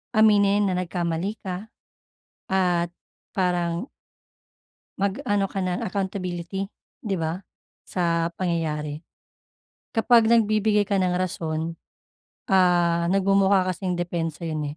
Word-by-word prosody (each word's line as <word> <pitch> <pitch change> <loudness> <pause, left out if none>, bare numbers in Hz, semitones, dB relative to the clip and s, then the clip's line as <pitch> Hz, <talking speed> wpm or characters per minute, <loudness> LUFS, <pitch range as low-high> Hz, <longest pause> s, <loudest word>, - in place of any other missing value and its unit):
aminin 205 -1 +5
na 180 - 0
nagkamali 175 +2 -2
ka 190 +2 -5 0.8
at 180 -2 +2 0.4
parang 175 +2 0 1.1
Mag, 200 +2 0
ano 200 -3 +1
ka - - -4
ng 185 -1 -1
accountability 190 -1 -3 0.3
'di 200 -4 -1
ba, 165 +3 -2 0.4
sa 170 -2 0
pangyayari. 155 -4 -2 0.9
Kapag 230 -1 +5
nagbibigay 215 -2 +3
ka 200 - +2
ng 185 -1 +1
rason, 165 -2 -2 0.8
ah, 175 -2 +3
nagmumukha 195 0 +3
kasing 180 0 -3
depensa 170 -2 -3
'yun, 155 -2 -3
180 Hz, 100 wpm, -24 LUFS, 170-195 Hz, 1.1 s, aminin